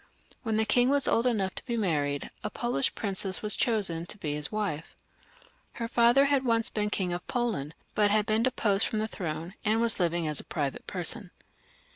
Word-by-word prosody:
When 225 -3 -1
the 220 - +2
king 245 +3 +3
was 280 -1 +3
old 230 +2 +2
enough 200 -6 0
to - - -8
be 235 -2 -1
married, 145 -8 -1
a 210 - -2
Polish 240 +4 0
princess 195 -2 -2
was 210 -1 +2
chosen 190 -8 0
to 210 - -7
be 150 -6 -3
his 150 0 -1
wife. 200 -8 -3 0.8
JHer 230 - -2
father 240 +3 +4
had 280 -1 +2
once 230 -1 +2
been 210 -1 -1
king 185 -4 -1
of 175 - -6
Poland, 220 - -2 0.2
but 210 -1 +3
had 210 0 +2
been 220 +1 +1
turned 255 0 -1 0.2
off - - +2
the 215 0 -1
throne, 170 -3 -5
and 220 +1 +2
was 230 -2 +4
living 170 -2 +1
as 150 -2 -1
a - - -6
private 145 -4 -4
person. - - 0
210 Hz, 200 wpm, -28 LUFS, 175-235 Hz, 0.8 s, father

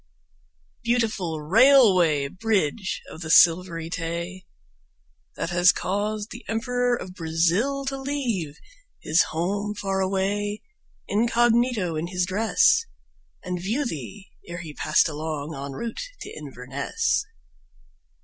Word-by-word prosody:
Beautiful 215 -9 0
Railway 185 - +5
Bridge 190 +1 -1
of 160 - -10
the 160 - -6
Silvery 165 0 +4
Tay! 170 +2 -5 0.9
That 165 - -3
has 175 0 +6
caused 210 +2 -2
the - - -9
Emperor 245 +2 0
of 185 -6 -8
Brazil 180 +12 0
to 270 0 -3
leave 235 - -2 0.4
His 160 +2 +3
home 200 +6 -2
far 195 -2 -2
away, 200 +2 -1 0.4
incognito 235 -3 +2
in 155 +2 -2
his 180 0 -1
dress, 215 - +3 0.6
And 180 -1 -4
view 230 +10 -1
thee 190 - -7 0.2
ere 170 0 -6
he 160 -3 -8
passed - - +2
along 155 0 -4
en 140 -1 -6
route 230 - -5 0.2
to - - -7
Inverness. 140 -2 -2
185 Hz, 115 wpm, -25 LUFS, 165-225 Hz, 0.9 s, has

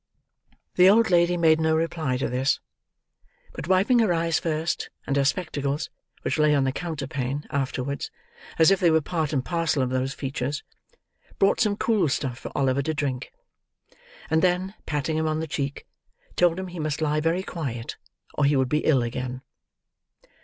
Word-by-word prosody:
The 180 +1 +8
old 220 -1 +4
lady 175 0 +4
made 160 -1 +4
no 160 0 +3
reply 160 -5 -1
to 135 - -1
this; 130 +2 +1 0.9
but - - -7
wiping 195 +7 +4
her 220 -5 +3
eyes 165 -1 +1
first, 160 0 -2 0.2
and 140 - -1
her 140 - +3
spectacles, 145 -1 -1 0.3
which - - -1
lay 150 -1 +4
on 140 - +3
the 135 - +1
counterpane, 140 -3 -4
afterwards, 140 0 -2 0.5
as 165 +3 +6
if 195 - +3
they 175 - +4
were 160 0 +4
part 155 -1 -2
and 135 -4 -1
parcel 165 -5 0
of 125 - -2
those 130 +1 -1
features, 135 +1 -3 0.7
brought 195 +1 +3
some 210 -3 +2
cool 210 -10 +2
stuff 130 -3 -2
for - - -7
Oliver 135 0 +2
to 155 +3 -2
drink; 135 -3 -3 1.0
and 160 - +2
then, 185 +2 +1
patting 150 +1 -1
him 160 0 0
on 155 0 0
the 160 - -2
cheek, 140 -2 -4 0.5
told 175 0 +3
him 190 -1 -5
he 175 -1 -8
must 155 -1 -2
lie 155 -1 +1
very 165 +4 0
quiet, 130 -11 -5 0.4
or 150 - +1
he 145 +1 +3
would 130 -2 +2
be 150 - +2
ill 135 -6 +3
again. 125 +2 -4
155 Hz, 175 wpm, -25 LUFS, 135-170 Hz, 1.0 s, The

